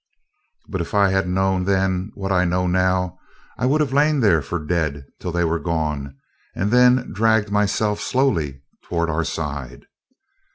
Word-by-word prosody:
But 95 -3 -3
if 85 - -5
I 100 -1 +4
had 95 0 +1
known 95 0 +1
then, 95 0 0
what 95 -1 -4
now 90 -1 +1
I - - 0
know, 90 0 0 0.4
I 125 - +1
would 150 +4 +2
have 140 -3 -1
lain 150 +1 +3
there 100 -10 +4
for 70 +6 -3
dead 75 -3 -2
till 90 - -4
they 85 +1 0
were 85 0 0
gone, 75 -3 -3 0.4
and 100 +3 -1
then 125 +1 +4
dragged 110 0 +2
myself 105 +1 +1
slowly 80 - 0 0.2
toward 85 -1 -2
our 80 +2 0
side. 70 -7 -5
90 Hz, 165 wpm, -21 LUFS, 80-105 Hz, 0.4 s, I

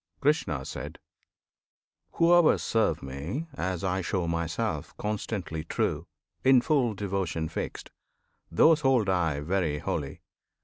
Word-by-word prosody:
Krishna. 100 - +1 1.5
Whoever 170 -1 +5
serve 95 -9 0
Me 70 - -4
as 95 -9 -3
I 95 0 0
show 90 -1 -1
Myself 85 0 -2
Constantly 100 -6 -3
true, 80 - -2 0.4
in 130 -1 +6
full 125 -6 +1
devotion 95 -5 -2
fixed, 80 - -5 0.6
Those 155 - +5
hold 130 -7 +3
I 80 -6 +1
very 85 -2 0
holy. 70 -1 -4
95 Hz, 105 wpm, -28 LUFS, 80-115 Hz, 1.5 s, in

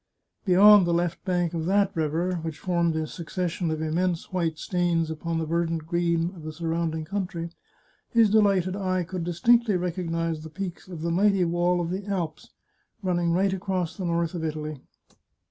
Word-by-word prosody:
Beyond 200 0 +7
the 170 - +2
left 175 0 -1
bank 175 -3 0
of 165 -1 -2
that 200 0 +2
river, 165 +3 0
which 160 -1 -5
formed 170 -2 0
a 160 0 -1
succession 175 +1 -3
of 155 0 -2
immense 170 +3 -1
white 165 -4 0
stains 170 -2 0
upon 165 +1 -3
the 160 - -1
verdant 165 0 -1
green 170 +1 0
of 170 - -11
the 155 0 -6
surrounding 165 0 -2
country, 175 -2 -4 0.6
his 230 -2 +5
delighted 195 -4 +3
eye 185 -2 0
could 180 0 -5
distinctly 215 +5 +3
recognise 165 -2 -2
the 160 - -9
peaks 185 +1 -6
of 170 -4 -7
the 170 - 0
mighty 195 +1 +3
wall 175 +1 +1
of 170 0 -2
the 190 +2 -4
Alps, 175 -6 -3 0.5
running 175 -2 +1
right 190 +3 +2
across 185 -3 -2
the 190 - -4
north 170 -1 0
of 170 -2 -4
Italy. 155 -2 -4
175 Hz, 175 wpm, -26 LUFS, 165-185 Hz, 0.6 s, Beyond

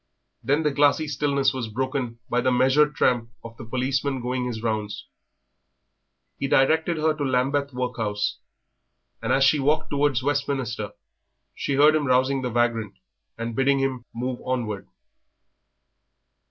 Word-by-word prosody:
Then 145 +4 +1
the 150 - +2
glassy 145 +2 +3
stillness 140 -1 +1
was 130 -3 -3
broken 130 +1 -3
by 125 - +1
the 130 +1 +2
measured 135 +4 +3
tramp 120 -3 +1
of 115 0 -10
the - - -8
policeman 130 +3 -1
going 125 +1 -2
his 115 -2 -4
rounds. 110 -2 -3 1.3
He 140 - -1
directed 160 +5 +3
her 155 0 +2
to 150 -1 -4
Lambeth 140 +2 0
Workhouse, 115 -5 -2 0.8
and - - -2
as 135 - +4
she 145 +2 +4
walked 145 +3 +1
towards 140 -3 +1
Westminster 135 -7 -2 0.6
she 140 - -2
heard 150 +2 +6
him 150 -2 0
rousing 130 +1 +2
the 125 - -2
vagrant 115 -3 0 0.4
and 115 0 -4
bidding 135 +2 +3
him 130 -3 -2
move 125 +1 -4
onward. 115 - -3
130 Hz, 140 wpm, -24 LUFS, 120-140 Hz, 1.3 s, heard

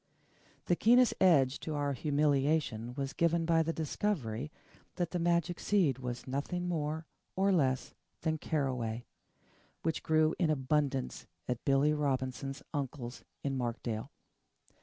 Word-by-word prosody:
The 175 - +3
keenest 245 +5 +5
edge 145 -7 +5
to 155 - -4
our 145 -1 0
humiliation 140 -4 +1
was 135 0 -3
given 170 +1 +2
by 165 0 +4
the 160 +1 0
discovery 150 - -2 0.4
that 175 -2 -1
the 180 - -1
magic 170 0 +1
seed 170 - +2
was 125 -1 -5
nothing 145 +7 -2
more 160 -1 -2 0.3
or 195 +1 +3
less 135 -8 +1 0.3
than 160 -1 0
caraway, 125 -7 -1 0.8
which 160 0 0
grew 155 0 +3
in 170 - +3
abundance 140 -3 0 0.2
at 125 -1 -2
Billy 140 +2 +4
Robinson's 135 -1 -2
uncle's 135 -3 -4 0.2
in 140 -1 -1
Markdale. 120 -3 -3
145 Hz, 130 wpm, -32 LUFS, 130-165 Hz, 0.8 s, keenest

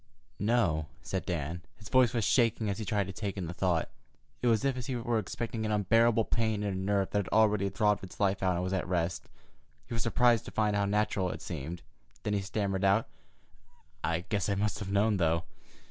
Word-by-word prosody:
"No," 95 -8 +1 0.2
said 95 - -3
Dan. 85 0 -2 0.2
His 105 -2 -11
voice 130 -3 +5
was 120 -3 0
shaking 110 0 +2
as 100 - -4
he 110 - -3
tried 100 0 0
to 95 - -7
take 100 0 -4
in 95 - -2
the 85 - -5
thought. 90 -2 +1 0.5
It 125 - +1
was 115 +2 +3
as 135 -2 +2
if 125 -2 -5
he 130 - -2
were 120 -1 0
expecting 115 +2 -4
an 110 - -1
unbearable 115 +2 +3
pain 110 -2 0
in 100 -1 -1
a - - -3
nerve 95 +1 0
that 105 - +1
had 100 - -2
already 105 -2 +3
throbbed 105 0 +1
its 95 - -10
life 100 -1 +1
out 90 -1 +2
and 90 - -1
was 95 +1 -2
at 95 -2 -1
rest. 85 -1 -1 0.6
He 125 - -8
was 115 - -1
surprised 120 +1 +3
to - - -8
find 105 -1 +1
how 100 0 +2
natural 100 -2 +1
it - - -6
seemed. 85 +1 -5 0.4
Then 105 - -1
he 100 - +1
stammered 95 -1 -2
out: 100 +3 +3 0.9
"I 85 0 0
guess 105 -1 -1
I 100 - +1
must 100 -1 -1
have 105 - -5
known, 105 +1 +3
though. 85 -1 +2
100 Hz, 225 wpm, -30 LUFS, 95-110 Hz, 0.9 s, voice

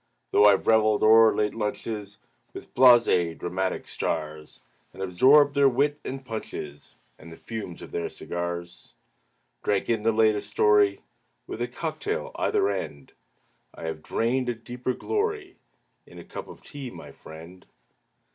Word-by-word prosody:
Though 105 - +5
I've 100 -2 +4
reveled 110 -1 +3
o'er 110 +1 +6
late 105 -1 0
lunches 105 -1 -5 0.4
With - - -10
blasé 115 -10 +5
dramatic 95 +1 -3
stars, 75 0 -4 0.3
And 95 - -6
absorbed 135 +11 +5
their 140 -1 +4
wit 145 +4 0
and 135 0 -6
punches 75 - -7 0.2
And 80 +1 -13
the - - -10
fumes 110 -6 -8
of - - -11
their 85 - -3
cigars 85 0 -6 0.7
Drank 100 +2 0
in 115 -2 0
the 115 +1 +2
latest 110 -2 +2
story, 105 -1 +3 0.4
With 115 - -7
a 120 - 0
cock 160 +3 -5
tail 475 +4 -3
either 410 -2 +1
end, 70 - -5 0.6
I - - -11
have 80 -1 -5
drained 125 +8 -1
a 120 - -1
deeper 125 +2 -5
glory 420 -3 -3 0.5
In - - -15
a - - -9
cup - - -8
of - - -13
tea, 140 -3 -8
my - - -11
friend. 85 +4 -13
110 Hz, 150 wpm, -26 LUFS, 90-130 Hz, 0.7 s, o'er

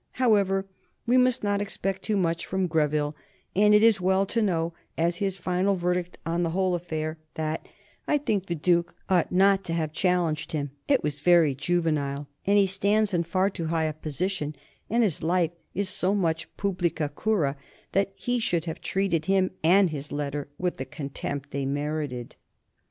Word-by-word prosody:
However, 200 -6 +2 0.4
we 245 +1 +3
must 255 -1 +3
not 205 0 +1
expect 195 -1 -2
too 215 -2 0
much 170 -3 0
from 190 0 0
Greville, 150 -2 +1 0.4
and 210 +2 +6
it 210 - +5
is 225 -4 +5
well 190 +2 +3
to 230 +4 0
know, 170 -5 0 0.2
as 170 +1 +1
his 195 -1 -1
final 185 +2 +1
verdict 180 0 -1
on 170 +2 0
the 170 - +1
whole 185 +2 +1
affair, 160 -2 -3 0.2
that 155 0 -3 0.4
"I 295 - +3
think 210 -9 -1
the 170 - -1
Duke 170 +2 +1
ought 180 -3 +2
not 195 +1 +4
to 165 - -3
have 160 -2 -1
challenged 175 -4 0
him; 145 -3 -2 0.2
it - - +3
was 145 -1 -2
very 170 -2 +5
juvenile, 145 -2 -1 0.2
and 200 +1 +5
he 200 - +6
stands 200 +2 +1
in 175 - +2
far 185 +4 +1
too 170 - -4
high 165 0 0
a 155 - -1
position, 155 +1 -3 0.3
and 235 +2 +3
his 190 -9 0
life 170 0 +2 0.2
is 200 +1 0
so 190 0 +1
much 165 -4 0
publica 175 -6 0
cura 165 -11 +1 0.4
that 195 0 +1
he 245 +3 -1
should 175 -7 0
have 160 -2 -5
treated 185 -5 0
him 190 -1 +3
and 180 +2 +5
his 145 -1 -6
letter 145 0 -3
with 180 -1 -1
the 130 - -4
contempt 140 0 -5
they 140 0 -2
merited." 145 -3 -3
175 Hz, 180 wpm, -26 LUFS, 155-195 Hz, 0.4 s, and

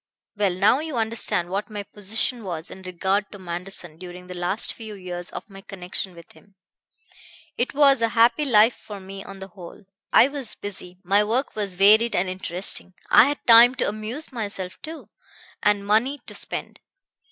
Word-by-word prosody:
"Well, 200 -3 0
now 205 +8 +4
you 310 -4 -4
understand 220 -6 0
what 200 +4 -3
my 205 -1 -5
position 220 +4 -1
was 170 -4 -5
in 190 - -10
regard 190 +3 -1
to 205 - -9
Manderson 175 -2 -5
during 180 0 -10
the 180 - -8
last 180 +4 0
few 220 -2 -9
years 175 -2 -7
of - - -8
my 195 -2 -12
connection 185 -1 -5
with 170 - -14
him. 200 -1 -22 1.0
It 240 - -2
was 275 -3 +5
a 230 - +2
happy 230 +5 +5
life 230 -3 +5
for 205 -2 -10
me 195 +1 -9
on 195 - -10
the 190 0 -9
whole. 180 +2 -12 0.3
I - - +7
was 280 -5 -2
busy, 185 -3 -7
my 200 +3 +3
work 235 +6 -1
was 200 -4 -3
varied 215 +5 +5
and 180 +2 +1
interesting. 185 0 -2 0.2
I - - +8
had 290 +2 -3
time 235 +2 +8
to 255 - -1
amuse 215 +9 -5
myself, 200 -6 -5
too, 320 +1 -9 0.5
and 205 -1 +2
money 225 +7 +2
to - - -9
spend. - - -3
205 Hz, 180 wpm, -23 LUFS, 185-230 Hz, 1.0 s, I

